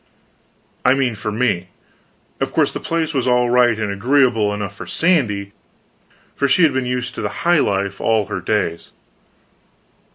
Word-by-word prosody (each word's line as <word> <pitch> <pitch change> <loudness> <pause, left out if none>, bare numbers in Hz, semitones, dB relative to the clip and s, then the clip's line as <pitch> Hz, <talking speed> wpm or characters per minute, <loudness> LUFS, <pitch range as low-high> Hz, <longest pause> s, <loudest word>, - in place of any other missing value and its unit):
I 125 +1 +4
mean, 130 -3 0
for 105 0 -5
me: 105 -6 0 0.7
of - - -2
course - - +2
the - - -5
place 165 -1 -2
was 130 -3 -1
all 125 -1 +2
right 120 -2 +4
and 110 -2 -2
agreeable 115 0 +2
enough 100 -1 -5
for - - -9
Sandy, 115 - 0 0.8
for 140 - +1
she 140 +6 +3
had 155 -4 +4
been 130 -1 -1
used 125 -1 -3
to 105 - -3
high 175 +6 +1
life 100 -3 -1
all 110 -2 +2
her 95 -2 -5
days. 90 -3 -2
120 Hz, 160 wpm, -19 LUFS, 105-130 Hz, 0.8 s, I